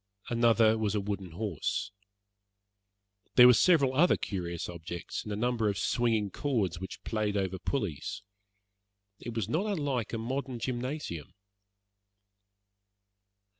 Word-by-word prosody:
Another 115 Hz, -2 st, +4 dB
was 105 Hz, -1 st, 0 dB
a -, -, +2 dB
wooden 100 Hz, -3 st, -4 dB
horse. 100 Hz, +1 st, -2 dB, 1.4 s
There 125 Hz, -, +10 dB
were 125 Hz, -, +9 dB
several 140 Hz, 0 st, +4 dB
other 170 Hz, +7 st, +4 dB
curious 85 Hz, -4 st, -4 dB
objects, 85 Hz, 0 st, -6 dB
and 105 Hz, -, -6 dB
a -, -, -1 dB
number 115 Hz, 0 st, +1 dB
of 100 Hz, -, -2 dB
swinging 110 Hz, +2 st, +1 dB
cords 105 Hz, -, -1 dB
which 95 Hz, 0 st, -8 dB
played 105 Hz, -2 st, -1 dB
over 95 Hz, -1 st, -1 dB
pulleys. 105 Hz, -, -3 dB, 1.0 s
It 120 Hz, -1 st, -7 dB
was 115 Hz, -5 st, -1 dB
not 185 Hz, +7 st, 0 dB
unlike 145 Hz, -, -1 dB
a 115 Hz, -, -2 dB
modern 130 Hz, +2 st, -3 dB
gymnasium. 120 Hz, -, -4 dB
110 Hz, 125 wpm, -30 LUFS, 95-125 Hz, 1.4 s, There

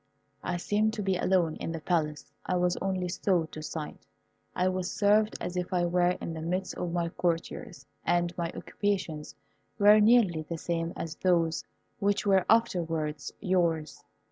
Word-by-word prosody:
I 175 Hz, -, -1 dB
seemed 210 Hz, +4 st, +1 dB
to 210 Hz, -, -3 dB
be 190 Hz, -1 st, +1 dB
alone 180 Hz, -3 st, +1 dB
in -, -, -4 dB
the 165 Hz, -, -4 dB
Palace. 155 Hz, -3 st, -1 dB, 0.2 s
I 185 Hz, -, -1 dB
was 180 Hz, 0 st, +2 dB
only 185 Hz, -1 st, -1 dB
so 180 Hz, -1 st, +1 dB
to 155 Hz, 0 st, -9 dB
sight. 155 Hz, 0 st, -6 dB, 0.5 s
I 180 Hz, -, +2 dB
was 185 Hz, 0 st, -1 dB
served 210 Hz, +1 st, +3 dB
as 180 Hz, -, -4 dB
if 180 Hz, 0 st, -2 dB
I 175 Hz, -1 st, +2 dB
were 175 Hz, +1 st, +2 dB
in 165 Hz, -, -5 dB
the 160 Hz, -, -5 dB
midst 180 Hz, +3 st, -2 dB
of 175 Hz, -, -3 dB
my 170 Hz, -1 st, 0 dB
courtiers, 165 Hz, -5 st, -3 dB, 0.2 s
and 175 Hz, 0 st, +1 dB
my 170 Hz, -1 st, -2 dB
occupations 185 Hz, -7 st, -3 dB, 0.4 s
were 210 Hz, 0 st, +7 dB
nearly 210 Hz, -7 st, +5 dB
the 165 Hz, +2 st, -5 dB
same 165 Hz, 0 st, -2 dB
as 160 Hz, -1 st, -5 dB
those 170 Hz, -3 st, +2 dB, 0.4 s
which 200 Hz, +1 st, +1 dB
were 195 Hz, -2 st, +3 dB
afterwards 165 Hz, -9 st, +1 dB
yours. 170 Hz, -5 st, 0 dB
175 Hz, 170 wpm, -29 LUFS, 165-190 Hz, 0.5 s, were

